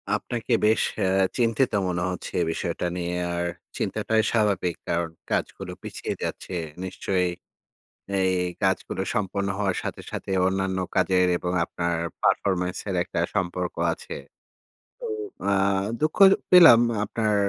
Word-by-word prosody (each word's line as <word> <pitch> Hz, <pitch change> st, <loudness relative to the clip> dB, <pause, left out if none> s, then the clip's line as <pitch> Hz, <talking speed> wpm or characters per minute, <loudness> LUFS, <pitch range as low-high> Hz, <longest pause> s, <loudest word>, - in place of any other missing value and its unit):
আপনাকে 120 Hz, 0 st, -3 dB
বেশ 110 Hz, +1 st, +4 dB, 0.2 s
এ -, -, +2 dB, 0.3 s
চিন্তিত 120 Hz, +2 st, +2 dB, 0.2 s
মনে 90 Hz, -1 st, -1 dB
হচ্ছে 90 Hz, -, -5 dB
এ -, -, +3 dB
বিষয়টা 90 Hz, -, -3 dB
নিয়ে। 90 Hz, 0 st, -2 dB, 0.2 s
আর 85 Hz, 0 st, -1 dB, 0.3 s
চিন্তাটাই 110 Hz, 0 st, 0 dB
স্বাভাবিক 100 Hz, -6 st, +1 dB
কারণ 85 Hz, -1 st, 0 dB, 0.2 s
কাজগুলো -, -, -2 dB
পিছিয়ে -, -, -4 dB
যাচ্ছে। -, -, -5 dB, 0.3 s
নিশ্চয় 95 Hz, 0 st, -1 dB, 1.0 s
এই 95 Hz, 0 st, +2 dB, 0.3 s
কাজগুলো 95 Hz, 0 st, 0 dB
সম্পন্ন 100 Hz, 0 st, -1 dB
হওয়ার 95 Hz, -3 st, 0 dB
সাথে, -, -, -5 dB
সাথে 95 Hz, -, -5 dB, 0.2 s
অন্যান্য 95 Hz, 0 st, -1 dB, 0.2 s
কাজের 90 Hz, -1 st, +3 dB
এবং 90 Hz, 0 st, -3 dB
আপনার 85 Hz, -1 st, -2 dB, 0.3 s
পারফরম্যান্সের 95 Hz, 0 st, 0 dB
একটা -, -, -4 dB, 0.2 s
সম্পর্ক 90 Hz, -1 st, -1 dB, 0.2 s
আছে। 475 Hz, 0 st, -8 dB, 0.9 s
তো 480 Hz, -, -5 dB, 0.4 s
আ -, -, +3 dB, 0.5 s
দুঃখ 155 Hz, 0 st, 0 dB, 0.3 s
পেলাম 165 Hz, -10 st, +9 dB, 0.2 s
আপনার 110 Hz, -2 st, 0 dB
95 Hz, 125 wpm, -25 LUFS, 90-110 Hz, 1.0 s, পেলাম